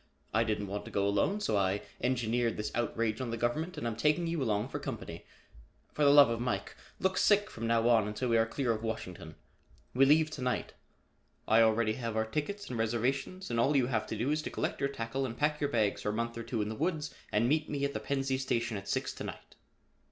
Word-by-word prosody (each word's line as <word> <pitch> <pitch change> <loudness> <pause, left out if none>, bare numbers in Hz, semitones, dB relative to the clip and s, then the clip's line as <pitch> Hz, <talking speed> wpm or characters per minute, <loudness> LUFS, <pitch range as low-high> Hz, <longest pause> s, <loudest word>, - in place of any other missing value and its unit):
I 110 +2 +4
didn't 110 -2 -1
want 100 +1 -4
to - - -8
go 100 0 0
alone, 195 - +1
so 110 - 0
I 100 0 +1 0.2
engineered 120 -2 0
this 105 0 -3
outrage 115 -1 -1
on 125 - -3
the 115 - -3
government 155 +11 -1
and - - -4
am 115 -2 -1
taking 150 +8 +2
you 165 -2 -1
along 110 -1 0
for - - -4
company. - - -6 0.7
For 150 - 0
the 140 - +7
love 140 -4 +8
of 115 - -1
Mike, 110 -6 -2 0.2
look 190 0 +1
sick 205 0 +3
from 115 0 -4
now 115 0 +3
on 115 -3 +4
until 105 +4 -2
we 115 - +4
are 115 - +3
clear 125 0 -1
of 110 -1 -2
Washington. 90 -7 -5 0.6
We 135 +2 +5
leave 155 +2 +4
to 150 - -6
night. 125 0 -1 0.7
I 110 +1 +6
already 110 0 +3
have 115 -2 -4
our 110 0 +1
tickets 155 - -3
and 120 - -4
reservations 130 - -1
and 115 - 0
all 140 +5 +3
you 130 - +3
have 115 -4 -1
to 110 - -4
do 120 +7 0
is 155 0 +1
to - - -5
collect - - -2
your 140 - +1
tackle 130 0 -3
and 120 -3 -4
pack 150 0 +1
your 145 - +1
bags 110 -6 +1
for - - -1
a - - -1
month 115 +1 -2
or 115 - -4
two 115 -2 -2
in 105 - -4
the - - -3
woods 155 +1 -2 0.2
and 110 +3 +2
meet 155 +3 +1
me 140 -1 -1
at 140 - -2
the - - -2
Pennsy 135 -1 -1
station 115 -4 -1
at 100 0 -8
six - - -1
to - - -7
night." - - -9
120 Hz, 245 wpm, -31 LUFS, 110-140 Hz, 0.7 s, love